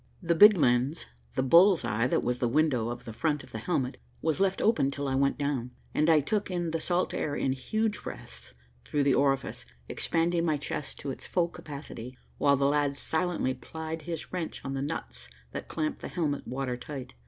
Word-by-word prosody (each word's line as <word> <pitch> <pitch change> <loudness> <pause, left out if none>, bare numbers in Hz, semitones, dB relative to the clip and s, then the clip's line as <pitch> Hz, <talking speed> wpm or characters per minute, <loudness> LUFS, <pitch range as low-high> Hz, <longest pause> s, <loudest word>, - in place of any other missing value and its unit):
The 170 0 +3
big 205 +4 +8
lens, 130 +1 +2 0.3
the - - +1
bull's 170 +6 +6
eye 115 +4 +1
that - - +1
was 125 0 -1
the 120 - +2
window 125 -3 +2
of 120 - -6
the 115 - -6
front 150 +4 0
of - - -15
the 110 - -5
helmet, 130 -1 -1 0.2
was 160 +2 0
left 195 -1 +2
open 220 -11 +3
till 140 0 -3
I 135 - 0
went 140 +1 +2
down, 140 -4 -2 0.2
and 155 +2 +2
I 155 -2 +6
took 205 +8 -1
in 175 -2 -1
the 165 - -1
salt 175 +2 0
air 145 - -1
in 135 - 0
huge 215 +11 -1
breaths 65 0 -9 0.3
through 145 -1 0
the 140 -1 +4
orifice, 135 -1 +1 0.2
expanding 170 +1 0
my 155 -3 +2
chest 145 0 -5
to 140 - -3
its - - -7
full 175 -2 +1
capacity, 140 -6 -8 0.2
while 140 -1 +4
the 140 - +2
lad 145 0 +2
silently 160 -5 0
plied 160 +3 -6
his 165 0 -6
wrench 175 -3 -4
on 135 - -3
the 135 - -2
nuts 60 - -5 0.2
that - - -6
clamped 155 -1 -2
the - - -4
helmet 150 -5 -2
water 130 -1 -2
tight. 130 - -7
145 Hz, 205 wpm, -29 LUFS, 130-165 Hz, 0.3 s, big